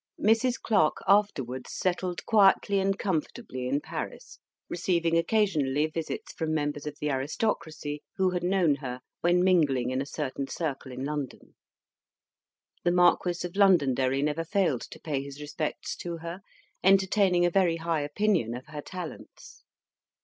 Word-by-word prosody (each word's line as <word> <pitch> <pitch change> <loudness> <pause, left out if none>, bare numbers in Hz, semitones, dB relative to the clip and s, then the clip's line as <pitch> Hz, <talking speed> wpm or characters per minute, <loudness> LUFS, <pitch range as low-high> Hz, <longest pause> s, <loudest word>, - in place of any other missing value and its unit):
Mrs. 225 +4 +3
Clarke 160 -9 +2
afterwards 135 - +1
settled 180 -1 -2
quietly 200 -2 +4
and 195 0 +1
comfortably 160 - -3
in 140 +3 +1
Paris, - - -7 0.3
receiving 170 -1 0
occasionally 165 -7 +2
visits 155 0 -5
from 160 -1 -2
members 145 -1 -2
of 145 0 -6
the 150 0 -1
aristocracy 150 +1 -2
who 190 -1 +2
had 180 -1 -2
known 175 -5 +2
her 130 -2 -6 0.2
when 175 +1 +3
mingling 150 -9 +3
in 130 +1 0
a 140 - -5
certain 140 -2 -4
circle 140 -5 -4
in 130 +2 -5
London. 145 -3 -5 1.3
The 175 - +3
Marquis 175 0 +3
of 175 - -7
Londonderry 140 -9 +3
never 150 +2 0
failed 165 - +1
to - - -11
pay 145 -4 -2
his 140 +1 -9
respects 150 +1 -4
to 170 -1 -5
her, 170 +2 -6 0.4
entertaining 190 -1 +4
a 175 - +2
very 180 -3 +3
high 165 -1 -1
opinion 150 - 0
of 125 - -8
her 150 -1 -6
talents. 180 0 -9
165 Hz, 145 wpm, -28 LUFS, 145-185 Hz, 1.3 s, quietly